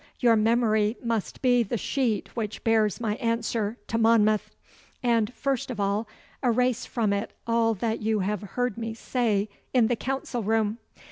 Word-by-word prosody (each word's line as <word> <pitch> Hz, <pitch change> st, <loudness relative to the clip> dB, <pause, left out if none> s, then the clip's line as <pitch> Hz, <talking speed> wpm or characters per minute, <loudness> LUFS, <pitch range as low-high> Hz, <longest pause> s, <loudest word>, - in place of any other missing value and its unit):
Your 235 Hz, -3 st, +5 dB
memory 220 Hz, 0 st, +2 dB
must 225 Hz, -, -2 dB
be 245 Hz, -1 st, +4 dB
the 235 Hz, +1 st, -1 dB
sheet 230 Hz, -3 st, -1 dB
which 220 Hz, -3 st, -4 dB
bears 220 Hz, -2 st, +2 dB
my 215 Hz, -2 st, -1 dB
answer 230 Hz, -1 st, -1 dB
to 225 Hz, -, -1 dB
Monmouth. 215 Hz, -2 st, +3 dB, 0.5 s
And 230 Hz, -3 st, +2 dB
first 270 Hz, -3 st, -1 dB
of 245 Hz, -, -5 dB
all, 200 Hz, +2 st, 0 dB, 0.3 s
erase 250 Hz, -1 st, +1 dB
from 220 Hz, -4 st, 0 dB
it 200 Hz, +1 st, -3 dB
all 230 Hz, -1 st, +2 dB
that 220 Hz, +3 st, -2 dB
you 215 Hz, -1 st, +1 dB
have 205 Hz, +1 st, -1 dB
heard 240 Hz, +2 st, -2 dB
me 225 Hz, -1 st, -4 dB
say 220 Hz, -4 st, 0 dB, 0.3 s
in 245 Hz, -3 st, +6 dB
the 240 Hz, +2 st, +1 dB
council 265 Hz, 0 st, -3 dB
room. 220 Hz, +1 st, 0 dB
225 Hz, 160 wpm, -26 LUFS, 215-240 Hz, 0.5 s, in